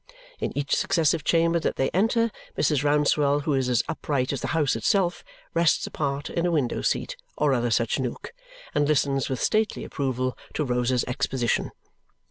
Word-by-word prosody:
In - - -2
each 145 -1 +1
successive 160 -4 +1
chamber 165 +1 +3
that - - -1
they 135 - 0
enter, 225 +5 +2 0.3
Mrs. 145 -3 +2
Rouncewell, 145 0 +2
who 150 - 0
is 130 -2 +1
as 120 -2 +2
upright 140 -4 -1
as 135 - -3
the - - -2
house 145 -4 +2
itself, 175 - +1 0.3
rests 170 -1 +2
apart 140 -1 -3
in 170 - -2
a 175 - +2
window 145 -7 0
seat - - -1 0.2
or 145 -2 +2
other 120 -1 +1
such 115 +2 +1
nook 130 - -4 0.4
and 145 - +2
listens 140 -2 +1
with 130 -2 -2
stately 215 0 0
approval 130 -2 -2 0.2
to 150 - 0
Rosa's 125 0 +1
exposition. 125 -1 -1
145 Hz, 170 wpm, -25 LUFS, 130-165 Hz, 0.4 s, chamber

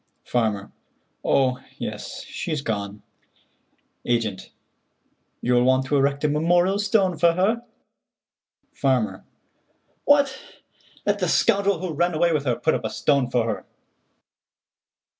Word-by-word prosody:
Farmer: 110 -4 -1 0.5
"Oh, 130 -2 +2 0.2
yes, - - -6
she's 150 -3 -4
gone." 100 -3 -4 1.0
Agent: 115 -5 -1 0.9
"You'll 120 0 +3
want 130 +1 +3
to 145 - 0
erect 140 +1 +1
a - - +4
memorial 175 +6 +2
stone 195 -5 +1
for 170 +1 +5
her?" 210 +7 +1 1.1
Farmer: 130 -5 0 0.8
"What! 285 -2 +3 0.7
Let - - +1
the - - 0
scoundrel 200 -3 +2
who 180 -3 -3
ran 175 +2 0
away 170 +1 +2
with 145 -2 -1
her 125 -3 +1
put 160 - +1
up - - -2
a - - -1
stone 140 -4 +1
for 120 -2 +1
her." 110 -2 -3
145 Hz, 120 wpm, -23 LUFS, 125-180 Hz, 1.1 s, for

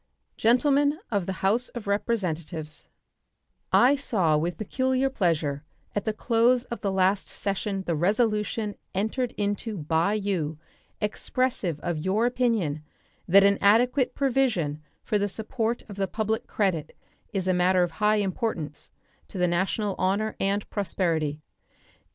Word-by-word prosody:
Gentlemen 285 +5 +3
of 200 -5 0
the 190 -1 -3
House 230 +6 +2
of 240 -3 -7
Representatives: 170 -7 -2 0.8
I 260 +4 +6
saw 195 - +1
with 170 +3 -1
peculiar 260 +5 0
pleasure 160 - 0 0.3
at 205 - -2
the 220 - +1
close 235 +2 +2
of 235 - -7
the 200 - 0
last 190 +1 +2
session 195 0 -3
the 170 - 0
resolution 210 +4 +1 0.2
entered 225 +5 -1
into 205 +1 -2
by 165 +5 +1
you 185 -7 -2 0.4
expressive 210 - -1
of 175 -3 -2
your 200 +5 +2
opinion 225 - 0 0.4
that 195 +3 +7
an 200 0 +4
adequate 245 +6 +3
provision 235 - +1 0.2
for 210 - 0
the 205 0 0
support 225 +3 -2
of 205 -2 -9
the 195 -1 0
public 220 +1 -2
credit 185 -7 -1 0.3
is 190 -3 -2
a 185 - +3
matter 180 0 +3
of 175 - -1
high 210 0 +4
importance 190 -6 -3 0.4
to - - -9
the 180 -1 +2
national 190 +4 0
honor 200 +4 0
and 200 +1 0
prosperity. 165 -7 -1
200 Hz, 140 wpm, -26 LUFS, 175-230 Hz, 0.8 s, that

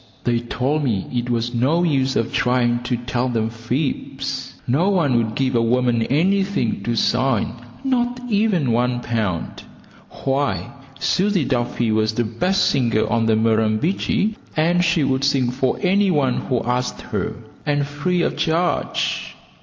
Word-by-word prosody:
They 120 -1 +1
told 130 +5 -1
me 110 -8 0
it 120 0 -1
was 120 0 -1
no 140 +9 +2
use 135 -5 +1
of 115 - 0
me - - -15
trying 120 -1 +2
to 125 -1 0
tell 120 +1 -2
them 115 -2 -1
fibs. 135 +2 -3
No 150 +11 +2
one 165 -10 +2
would 110 -2 0
give 130 -1 0
a 120 - +3
woman 120 0 +2
anything 190 - +1
to 120 - 0
sing, 125 0 +1 0.3
not 245 -2 0
even 200 - +1
one 120 +1 +1
pound. 105 -9 -2 0.6
Why, 135 -10 0 0.3
Susie 190 +1 +1
Duffy 120 -3 0
was 110 0 +1
the 120 - +1
best 180 - +1
singer 115 -5 +1
on 115 0 +2
the 110 - +4
Murrumbidgee, 110 - +1 0.2
and 175 +3 +3
she 170 -3 +2
would 135 0 0
sing 135 -3 +2
for 130 0 0
any 195 +2 +3
one 140 -7 +1
who 125 -3 +1
asked 125 +1 -2
her, - - -3 0.3
and 145 -1 +1
free 170 +5 -1
of - - 0
charge. 170 +2 -1
130 Hz, 155 wpm, -21 LUFS, 120-160 Hz, 0.6 s, the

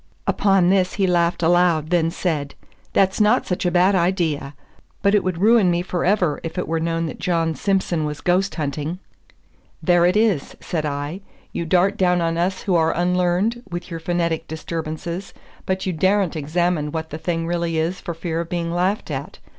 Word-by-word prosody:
Upon 195 -3 +3
this 185 -2 +2
he 195 - +2
laughed 175 -1 +1
aloud, 170 -2 +3
then 165 -2 +3
said, 155 -5 -2 0.4
"That's 195 +2 +2
not 215 +4 +3
such 180 0 -1
a - - +3
bad 180 +3 +4
idea; 170 -6 0 0.5
but 200 0 +4
it 210 - +3
would 185 -2 -2
ruin 210 0 +4
me 175 0 +1
forever 180 -3 +1
if 165 +2 -6
it 180 - -2
were 165 0 0
known 165 0 -1
that 155 - -6
John 165 -3 0
Simson 190 -3 0
was 150 -1 -3
ghost 185 +2 +1
hunting." 150 +2 -3 0.9
"There 175 -1 +4
it 180 - +2
is," 215 -10 +1
said 155 -3 -2
I; 145 +6 -4 0.3
"you 170 - -3
dart 185 +4 +3
down 180 -2 +3
on 165 -1 0
us 180 +3 -1
who 190 - 0
are 160 -2 +2
unlearned 180 +6 +1
with 175 +1 -6
your 165 - -4
phonetic 170 -1 -1
disturbances, 165 +3 -5 0.3
but 190 0 -1
you 185 - -1
daren't 190 +2 +1
examine 155 0 0
what 160 0 -4
the 155 - -5
thing 165 0 -2
really 170 -1 -1
is 165 +3 -1
for 170 - -5
fear 165 0 -2
of 170 - -7
being 170 -1 -2
laughed 185 +4 0
at. - - -5
175 Hz, 185 wpm, -21 LUFS, 165-185 Hz, 0.9 s, bad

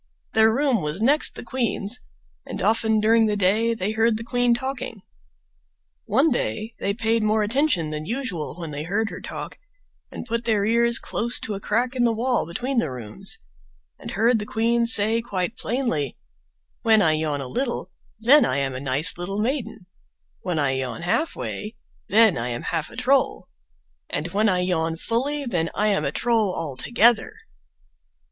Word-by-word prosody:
Their 220 0 +5
room 260 -3 +1
was 150 +4 -2
next 290 +5 +3
the - - -7
queen's, 235 -2 -2 0.4
and - - -7
often 220 0 +2
during 225 +1 +4
the 210 - 0
day 215 +4 +2
they 200 0 -2
heard 225 0 +2
the 225 - -6
queen 245 0 +2
talking. 250 -5 -5 1.0
One 295 +3 +3
day 225 -2 -2
they 200 0 -1
paid 225 0 +1
more 215 0 +2
attention 210 - +1
than 155 +1 -5
usual 230 - -3
when 165 -3 -5
they 145 0 -4
heard 205 +7 -1
her - - -7
talk, - - -7 0.5
and - - -8
put 230 0 -3
their 215 -3 +2
ears 235 +1 +4
close 235 +2 -1
to 215 - -3
a 195 - -4
crack 240 +6 0
in 245 - +1
the 235 - +3
wall 240 -3 0
between 250 +9 -1
the 235 - -1
rooms, 115 -5 -6 0.6
and - - -8
heard 225 +3 +2
the 210 - -4
queen 235 +1 +1
say 225 +1 +4
quite 200 -1 -3
plainly: 220 - -2 0.6
"When 220 -2 +4
I 160 - +4
yawn 155 -2 -1
a 135 - -5
little, 240 - -3 0.3
then 255 +6 +6
I 140 - 0
am 135 -1 -1
a 130 - -5
nice 140 +5 +2
little 195 +3 -3
maiden: 225 -4 -2 0.6
when 180 -3 -2
I 140 -3 +1
yawn 130 +4 -4
halfway, 215 - -2 0.3
then 215 - +5
I 115 - -2
am 120 -1 -4
half 160 -3 -2
a - - -13
troll; 260 +3 +1 0.6
and - - -2
when 215 +2 +2
I 180 -1 +1
yawn 165 -3 0
fully 275 - -1
then 170 -9 -1
I 210 +1 +2
am 200 - +1
a - - 0
troll 225 -5 +1
altogether." 215 - +2
220 Hz, 175 wpm, -23 LUFS, 175-235 Hz, 1.0 s, then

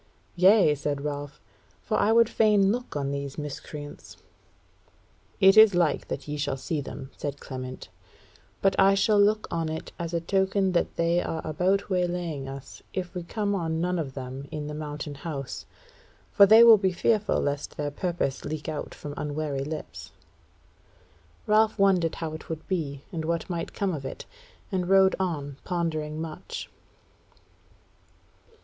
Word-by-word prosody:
"Yea," 185 -2 +6
said 145 -1 -3
Ralph, 145 0 -5 0.4
"for - - -1
I 215 - +3
would 230 0 +6
fain 210 -3 +3
look 245 -3 -4
on 140 -1 -1
these 140 -1 -4
miscreants." 145 0 -8 1.2
"It 195 +1 +7
is 215 -3 +8
like 170 -3 +1
that - - -5
ye 150 0 -3
shall 145 -2 -2
see 150 +3 -3
them," 135 -1 -8
said 145 -1 -5
Clement; 130 -1 -7 0.8
"but 195 -1 +4
I 195 0 +6
shall 205 +1 +3
look 215 +1 +2
on 165 -1 -1
it 160 0 -5
as 170 0 -3
a - - +2
token 190 +2 +1
that 175 - 0
they 170 +1 +2
are 160 - -4
about 190 +6 0
waylaying 175 -6 -1
us 135 0 -9
if 180 -2 -3
we 180 - -4
come 205 +4 -2
on 165 -4 -1
none 180 +1 0
of 135 -5 -4
them 130 +1 -6
in 150 -1 -4
the 150 - -5
Mountain 150 -1 -5
House. 140 -6 -5 0.6
For 200 -2 +7
they 220 +3 +9
will 225 -2 +9
be 190 -1 +1
fearful 210 +4 +1
lest 145 0 -3
their 145 -1 -2
purpose 170 -4 -2
leak 155 0 -5
out 155 -2 -5
from 145 - -7
unwary 145 -2 -2
lips." 155 +2 -7 1.3
Ralph 215 +1 +3
wondered 190 -5 +3
how 160 -2 -4
it 155 - -9
would 160 -1 -6
be, 145 -7 -3
and 165 -3 -3
what 170 +3 -2
might 170 -1 -3
come 195 -2 0
of 145 -4 -5
it, 135 - -7 0.5
and 185 -2 -1
rode 190 0 +5
on, 145 -7 -3
pondering 155 -4 -2
much. 160 -1 -6
165 Hz, 160 wpm, -27 LUFS, 145-190 Hz, 1.3 s, they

